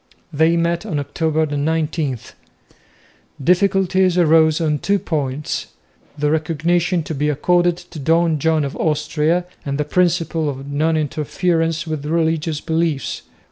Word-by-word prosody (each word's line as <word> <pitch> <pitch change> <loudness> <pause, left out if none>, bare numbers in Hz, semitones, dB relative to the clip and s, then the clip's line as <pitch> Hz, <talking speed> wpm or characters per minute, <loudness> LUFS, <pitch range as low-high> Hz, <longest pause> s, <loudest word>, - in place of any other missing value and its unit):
They 160 +3 +3
met 170 0 0
on 190 -9 -3
October 155 +2 0
19. 150 -1 -1 1.3
Difficulties 185 +1 +2
arose 160 -2 +4
on 155 -3 0
two 200 +6 +1
points 145 -5 -3 0.5
the 150 0 +1
recognition 165 +3 0
to 160 - -5
be 150 +1 0
accorded 175 +4 +2
to 160 - -11
Don 165 +2 +2
John 160 0 +1
of 140 - -5
Austria, 155 +2 0 0.2
and 140 -1 -3
the 150 - -1
principle 165 -1 +1
of 135 0 -6
non 155 +3 +1
interference 165 +2 -1
with 155 -3 -4
religious 160 -1 0
beliefs. 160 -4 -1
160 Hz, 130 wpm, -19 LUFS, 150-170 Hz, 1.3 s, arose